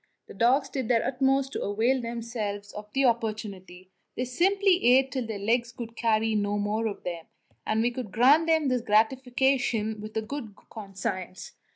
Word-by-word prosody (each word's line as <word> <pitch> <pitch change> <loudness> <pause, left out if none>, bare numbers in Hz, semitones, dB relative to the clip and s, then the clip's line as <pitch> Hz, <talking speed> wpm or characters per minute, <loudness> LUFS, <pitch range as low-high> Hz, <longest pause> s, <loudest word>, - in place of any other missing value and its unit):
The - - -12
dogs 250 +7 +2
did 260 -4 -4
their 230 -1 +2
utmost 270 +1 +1
to - - -3
avail 230 +6 +1
themselves 225 -3 -5
of 210 0 -9
the 270 +3 +1
opportunity; 205 -6 -3 0.2
they 250 - -2
simply 375 +8 +2
ate 260 +2 +5
till 255 -3 -3
their 220 -2 -4
legs 235 +3 0
would 235 -2 -5
no 230 -1 -1
longer 220 0 0 0.6
carry - - -26
them, 165 - -15 0.4
and 220 +1 +1
we 240 - +1
could 240 -5 -6
grant 275 - +5
them 320 -4 +2
this 250 -1 0
gratification 240 -1 +1
with 215 +1 -7
a 220 - -1
good 225 -3 -7 0.2
conscience. 190 -3 -6
235 Hz, 170 wpm, -27 LUFS, 215-265 Hz, 0.6 s, ate